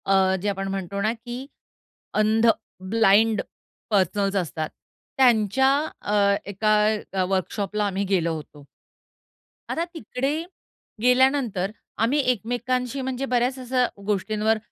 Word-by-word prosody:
अ, 190 -1 +3
जे 205 - -2
आपण 195 -1 -3
म्हणतो 195 0 -3
ना 215 +3 +1
की 240 +2 -7 0.7
अंध, 220 +2 +3 0.4
ब्लाइंड 220 0 +4 0.5
पर्सनल्स 200 0 +1
असतात. 160 -4 -2 0.5
त्यांच्या 245 0 +4 0.3
अ, 200 -1 +2
एका 215 +2 +1 0.5
वर्कशॉपला 200 +2 -1
आम्ही 195 0 -1
गेलो 170 -4 +1
होतो. 150 -2 -10 1.0
आता 330 - -1
तिकडे 270 -1 -2 0.7
गेल्यानंतर 250 -6 +3 0.3
आम्ही 265 +6 +2
एकमेकांशी 250 +3 -2
म्हणजे 260 0 -2
बऱ्याच 250 +1 0
अशा 250 0 +1 0.2
गोष्टींवर 215 +2 +1
215 Hz, 105 wpm, -24 LUFS, 195-250 Hz, 1.0 s, ब्लाइंड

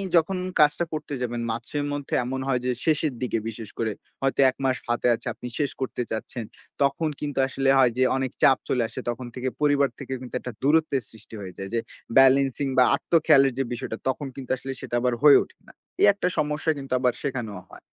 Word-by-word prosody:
যখন 170 +3 +3 0.2
কাজটা 150 +3 +4
করতে 150 -1 -4
যাবেন, 120 -1 -2
মাসের 120 +6 -3
মধ্যে 145 -1 -5
এমন 130 +2 -3
হয় 125 -2 +1
যে, 125 - +2
শেষের 155 -2 +2
দিকে 125 -2 0
বিশেষ 110 -2 -8
করে। 110 -1 0 0.3
হয়তো 135 0 0
১ 130 - -6
মাস 130 -1 +2
হাতে 120 +1 +1
আছে, - - -10
আপনি 125 - -8
শেষ 145 -2 0
করতে 130 -1 -2
চাচ্ছেন। 110 +1 -4 0.4
তখন 140 +3 +1
কিন্তু 145 -2 -3
আসলে 135 0 0
হয় 130 -2 +5
যে 130 - +4
অনেক 130 -2 -2
চাপ 135 - +7
চলে 125 -2 +2
আসে, - - -7
তখন 120 +1 -4
থেকে, 130 0 -2
পরিবার 145 -2 +3
থেকে 135 -2 -5
কিন্তু 125 -1 -8
একটা 125 - -6
দূরত্বের 145 -2 +2
সৃষ্টি 110 0 -13
হয়ে 95 -2 -7
যায়। 95 0 -6
যে 115 - +2 0.4
বেলেন্সিং 135 +1 +5
বা 130 - +8
আত্ম - - -12
খেয়ালের 135 -4 +5
যে - - +3
বিষয়টা, 115 -1 -5
তখন 140 +2 -2
কিন্তু 135 -3 -7
আসলে 135 +1 -6
সেটা - - -4
আবার 125 0 +1
হয়ে 145 -2 +9
ওঠে - - -20
না। - - -15 0.3
এই - - +7
একটা 200 -2 -1
সমস্যা 150 +1 0
কিন্তু 135 -2 -5
আবার 125 -1 +2
সেখানেও 120 -8 -3
হয়। - - -12
135 Hz, 210 wpm, -25 LUFS, 125-145 Hz, 0.4 s, হয়ে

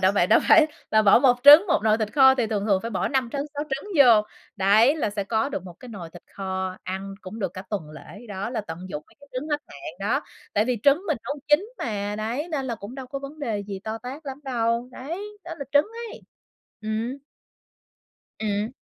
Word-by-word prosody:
đã 190 0 +4
vậy 195 -3 +2
đâu 215 - +5
phải 315 -2 +7 0.2
là 220 0 +4
bỏ 200 0 +7
1 250 -1 +4
trứng, 295 +7 +10
một 345 - +2
nồi 220 0 +3
thịt 210 -1 -2
kho 265 -2 +7
thì 245 -4 0
thường 210 -2 -2
thường 195 -3 +2
phải 230 - -4
bỏ 195 - -1
5 260 -4 0
trứng, 285 +1 -2
6 290 +1 -3
trứng 275 +10 -4
vô. 235 -6 +7 0.3
Đấy, 215 +9 +4
là 250 - -1
sẽ 205 -1 -3
có 220 +5 0
được 195 -10 -4
một 175 - -10
cái 250 - -11
nồi 185 -8 -8
thịt 175 +1 -13
kho, 190 -1 -3
ăn 190 +1 -5
cũng 215 +2 -9
được 190 -5 -2
cả 185 - -6
tuần 190 -8 -4
lễ 200 +8 -12
đó, 200 +2 -4
là 245 - -2
tận 165 -6 -8
dụng 150 -4 -5
mấy - - -24
cái 285 - -17
trứng 255 +4 -4
hết 295 -1 0
hạn 140 +2 -9 0.2
đó. - - +2 0.3
Tại 210 - +3
vì 250 0 -1
trứng 285 +5 +4
mình 310 - 0
nấu 285 - -3
chín 365 +11 +3
mà, 205 -3 -3
đấy, 240 +9 -3
nên 285 -4 -2
là 240 - -2
cũng 210 +2 -9
đâu 265 -1 -7
có 275 +2 -5
vấn 280 +3 -9
đề 230 -8 -2
gì 200 -1 -6
to 220 +1 -4
tát 270 +6 -9
lắm 270 +1 -6
đâu. 235 -2 -1
Đấy, 380 +12 -7
đó 340 - -6
là 280 - -4
trứng 290 +1 +5 0.3
ấy. - - -11 0.6
Ừm. 220 +4 -2 1.2
Ừm. 210 +2 -1
230 Hz, 240 wpm, -24 LUFS, 200-275 Hz, 1.2 s, trứng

